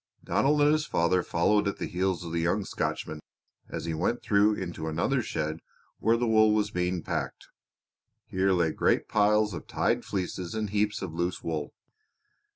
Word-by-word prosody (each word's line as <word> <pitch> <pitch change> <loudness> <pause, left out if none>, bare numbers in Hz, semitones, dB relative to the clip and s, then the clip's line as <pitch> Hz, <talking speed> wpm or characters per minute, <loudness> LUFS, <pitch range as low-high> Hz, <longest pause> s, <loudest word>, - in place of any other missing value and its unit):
Donald 135 +12 +2
and 145 +1 +5
his 155 0 +1
father 85 +2 +2
followed 105 +5 +2
at 100 - -2
the - - -3
heels 90 0 -1
of 85 - -6
the 85 0 0
young 95 +4 0
Scotchman 80 - -3 0.5
as - - -5
he 85 - -2
went 90 +9 -1
through 105 +1 +3
into 85 -4 -5
another 90 - 0
shed 80 -6 -3 0.4
where 115 +2 +3
the 120 - 0
wool 110 -1 +4
was 105 -1 0
being 90 -1 -1
packed. - - -4 0.8
Here 95 +1 +1
lay 85 -3 +2
great - - +1
piles 105 0 +3
of 80 - -7
tied - - 0
fleeces 90 -1 -4
and 105 -2 -2
heaps 105 0 0
of 85 -4 -5
loose 85 +2 -2
wool. 80 -3 -3
95 Hz, 175 wpm, -28 LUFS, 85-105 Hz, 0.8 s, and